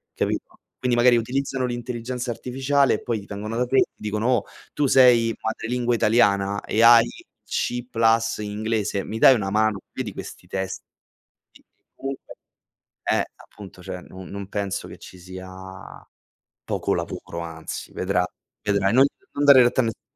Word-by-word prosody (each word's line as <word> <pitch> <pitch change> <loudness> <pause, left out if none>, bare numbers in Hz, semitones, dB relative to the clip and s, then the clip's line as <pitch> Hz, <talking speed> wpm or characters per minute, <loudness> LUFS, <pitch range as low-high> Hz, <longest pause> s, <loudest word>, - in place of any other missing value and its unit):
capito? - - -2 0.2
Quindi 125 -2 +1
magari 120 0 +6
utilizzano 130 +2 -1
l'intelligenza 120 0 -4
artificiale 135 +3 +1
e - - -6
poi 115 -3 -1
ti 100 - -12
vengono 105 +3 -5
da 125 - +1
te 130 +2 +1
e - - +7
ti - - 0
dicono: 105 +2 -2
"Oh 125 -4 +2 0.3
tu 145 - +1
sei 125 -2 +7
di 115 - -2
madrelingua 120 +2 -1
italiana 100 -3 +2
e 110 - 0
hai 115 0 +8 0.4
C 120 0 -2
plus 115 0 +2
inglese, 105 -1 -2
mi 110 +2 -5
dai 130 - +8
una 95 -4 -2
mano? 105 -1 +1
Vedi - - -5
questi - - -9
testi?" 95 0 -4 0.7
E - - -21 0.3
comunque 135 0 -7 0.8
eh - - +2
appunto, 95 -3 -14
cioè, 90 +1 -7
non 95 0 -11
non 100 -1 -7
penso 100 -2 -3
che - - -11
ci 90 - -12
sia 95 +1 -10 1.2
poco - - -1
lavoro, 85 - -5
anzi 80 -1 -7
vedra 90 -1 0 0.4
vedrai. 100 0 +1
Non 135 +2 +7 0.3
non 145 - +1
dare 140 -3 +9
retta 120 +2 +2
a - - 0
nessuno. 115 - -4
115 Hz, 165 wpm, -23 LUFS, 100-125 Hz, 1.2 s, dare